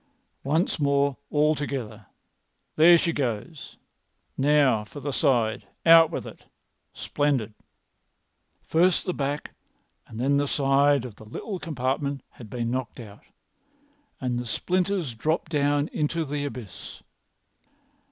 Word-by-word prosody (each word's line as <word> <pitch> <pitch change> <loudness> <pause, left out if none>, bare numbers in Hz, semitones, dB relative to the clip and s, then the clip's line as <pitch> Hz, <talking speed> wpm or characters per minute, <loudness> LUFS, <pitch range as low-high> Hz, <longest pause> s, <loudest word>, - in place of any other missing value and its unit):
Once 155 +5 0
more 140 -1 +2
all 150 +1 +3
together! 120 -8 -5 0.7
There 170 +2 +7
she 165 0 0
goes! 130 +3 -4 0.6
Now 140 -5 +3
for 125 +7 -10
the 145 +1 -4
side! 120 -7 +1 0.2
Out 165 -1 +8
with - - -5
it! - - -12 0.5
Splendid!" 135 -7 -1 1.1
First 175 +3 +2
the 180 - -1
back 145 0 -3 0.5
and 110 - -9
then 140 +3 +2
the 145 0 +1
side 140 -1 +2
of 115 -5 -9
the 110 - -13
little 185 - -6
compartment 140 -2 -2
had 115 -4 -13
been 120 +1 -3
knocked 130 0 -4
out, 105 -3 -11 1.0
and 125 -2 -2
the 120 - -5
splinters 180 - -1
dropped 155 +7 -2
down 145 -1 +1
into 160 +2 -1
the 145 0 -3
abyss. 120 -9 -9
140 Hz, 125 wpm, -25 LUFS, 125-155 Hz, 1.1 s, Out